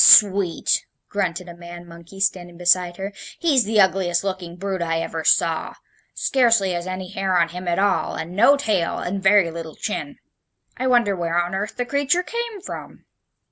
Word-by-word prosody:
"Sweet!" 195 -4 +5 0.2
grunted 180 -3 -2
a 175 - -9
man 175 0 -10
monkey 170 +3 -13
standing 175 -3 -1
beside 175 0 +2
her, 195 +1 -5 0.2
"he's 285 - +2
the 215 0 +1
ugliest 185 -2 +2
looking 185 -3 -4
brute 190 0 -4
I 165 -1 0
ever 165 -1 -4
saw! 165 0 +2 0.4
Scarcely 230 -7 +2
has 175 0 -3
any 185 0 -5
hair 190 -1 0
on 170 -1 +2
him 180 +1 -7
at 170 - 0
all, 200 0 +1
and 170 +3 -6
no 240 +8 +5
tail, 210 -10 0
and 195 +2 -3
very 190 -3 +4
little 165 -1 -7
chin. 280 +6 -4 0.6
I 260 - -2
wonder 240 -6 +3
where 170 -1 -1
on 175 +1 -2
earth 200 +2 -3
the 245 - -1
creature 285 +7 +1
came 470 -1 -5
from?" - - -9
190 Hz, 180 wpm, -22 LUFS, 175-210 Hz, 0.6 s, Sweet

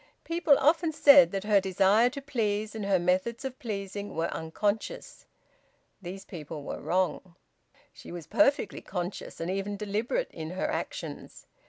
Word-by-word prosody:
People 330 -4 +3
often 320 +3 +3
said 280 -3 +7
that 195 -1 -3
her 210 -2 +4
desire 195 +5 +4
to 280 +1 -8
please, 215 -6 -1
and 215 -3 -4
her 195 -1 +4
methods 185 +9 0
of 260 -1 -5
pleasing, 200 -2 -5
were 165 +1 -1
unconscious. 210 - -3 0.7
These 190 +2 -8
people 155 -4 -8
were - - -6
wrong. 185 0 -1 0.6
She - - -12
was 170 -2 -7
perfectly 280 -8 +2
conscious 180 0 -5
and 165 +2 -2
even 195 +1 -3
deliberate 215 - -2
in 160 -1 -6
her 185 +2 -3
actions. - - -5
205 Hz, 150 wpm, -28 LUFS, 185-250 Hz, 0.7 s, said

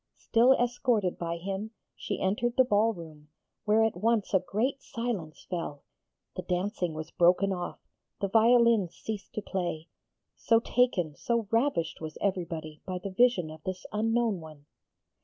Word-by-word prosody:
Still 240 +3 +4
escorted 245 -6 0
by 170 0 -2
him 195 +4 -4 0.3
she - - -4
entered 225 +5 0
the 260 - +7
ball 220 -1 +3
room, 155 -6 -11 0.4
where 215 +1 +4
at 225 -4 +1
once 215 +2 +1
a 190 - +6
great 220 +10 -1
silence 225 -10 -4
fell, 165 -5 -4 0.5
the - - -3
dancing 180 -2 -2
was 155 +1 -6
broken 180 +3 +3
off, 180 -1 -5 0.4
the 200 - 0
violins 225 -3 +4
ceased 215 -2 -6
to 215 - -3
play 175 -5 -3 0.5
so 225 -1 +3
taken, 220 -11 +1
so 230 - -1
ravished 230 - 0
was 155 -1 -6
everybody 165 -6 -3
by 185 -1 -4
the 190 +2 -6
vision 185 -6 +3
of 155 0 -11
this 185 +2 -5
unknown 225 -1 +1
one. 155 -2 -12
195 Hz, 155 wpm, -29 LUFS, 170-230 Hz, 0.5 s, the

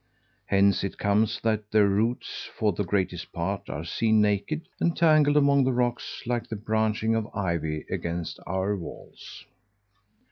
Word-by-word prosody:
Hence 100 0 +3
it 100 - -4
comes 100 +2 +1
that 110 -2 -1
their 105 -1 +4
roots, 110 +5 -1
for 105 -2 +2
the 95 - -1
greatest 90 -2 -2
part, 95 +4 -3
are 75 +5 -5
seen 110 +5 +2
naked, 105 - 0
entangled 155 -4 +4
among 140 -1 +4
the 130 0 +1
rocks 120 0 -2
like 120 -1 -2
the 110 - -3
branching 110 +1 0
of 110 -1 -1
ivy 85 -6 -2
against 85 0 -4
our 95 +3 0
walls. 90 -4 -10
105 Hz, 145 wpm, -26 LUFS, 95-120 Hz, -, their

